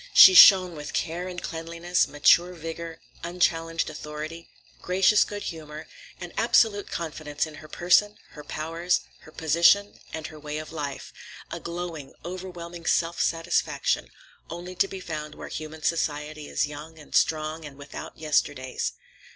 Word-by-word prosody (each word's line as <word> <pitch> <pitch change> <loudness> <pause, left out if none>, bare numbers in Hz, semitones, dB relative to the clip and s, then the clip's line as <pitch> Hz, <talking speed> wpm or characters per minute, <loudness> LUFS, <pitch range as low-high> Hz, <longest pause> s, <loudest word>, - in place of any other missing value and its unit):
She 190 - +11
shone 185 -2 +9
with 150 -1 -7
care 175 +3 -2
and 180 -1 -5
cleanliness, 170 +2 -1
mature 175 +4 +4
vigor, 165 0 -7 0.2
unchallenged 165 -1 0
authority, 155 +2 -7 0.3
gracious 190 +3 +4
good 205 -1 -6
humor, 155 -1 -7 0.3
and - - -8
absolute 205 -3 +3
confidence 155 -3 -3
in 155 - -10
her 155 - -12
person, 185 +6 +3
her 150 - -11
powers, 165 +4 -1 0.2
her 155 - -16
position, 170 +6 +3
and 160 -1 -5
her 155 -1 -9
way 150 0 -5
of 155 0 -7
life; 145 -4 -5 0.4
a - - -4
glowing, 170 -4 -6
overwhelming 175 -2 -7
self 170 0 +1
satisfaction, 165 +1 0 0.4
only 175 +2 -7
to 190 +2 +2
be 195 - -7
found 155 -3 -6
where - - -9
human 155 0 -7
society 150 -2 -2
is - - +1
young 150 +2 -9
and 150 - -14
strong 155 0 +1
and 145 -2 -10
without 145 0 -9
yesterdays. 145 -4 -1
165 Hz, 145 wpm, -26 LUFS, 155-175 Hz, 0.4 s, She